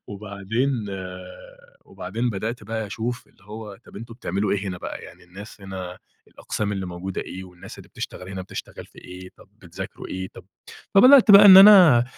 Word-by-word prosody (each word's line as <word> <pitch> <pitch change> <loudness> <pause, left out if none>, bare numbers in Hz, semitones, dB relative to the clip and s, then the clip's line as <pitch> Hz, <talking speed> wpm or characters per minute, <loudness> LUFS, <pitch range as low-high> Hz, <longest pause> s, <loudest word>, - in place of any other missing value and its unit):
وبعدين 105 +5 -4 1.1
وبعدين 115 +7 -5
بَدأت 110 +3 -5
بقى 110 0 -5
أشوف 120 +4 -6
اللي 100 - -27
هو 105 -1 -10
طب - - -15
أنتُم 115 +2 -10
بتعمَلوا 100 -3 -3
إيه 100 0 -3
هنا 90 -1 -6
بقى، - - -8
يعني - - -15
الناس 100 +4 -13
هنا 95 -2 -8 0.3
الأقسام 105 -1 -5
اللي 95 -2 -5
موجودة 90 +2 -6
إيه؟ 95 0 -9
والناس 90 -1 -14
اللي - - -14
بتشتغل 90 - -9
هنا 95 -1 -7
بتشتغل 95 - -10
في - - -21
إيه؟ 90 0 -12
طب - - -20
بتذاكروا 90 -6 -10
إيه؟ 95 0 -6
طب - - -13 0.5
فبَدأت 250 +3 +7
بقى 200 +1 +9
إن 190 -2 +10
أنا 185 - +8
100 Hz, 175 wpm, -22 LUFS, 95-120 Hz, 1.1 s, إن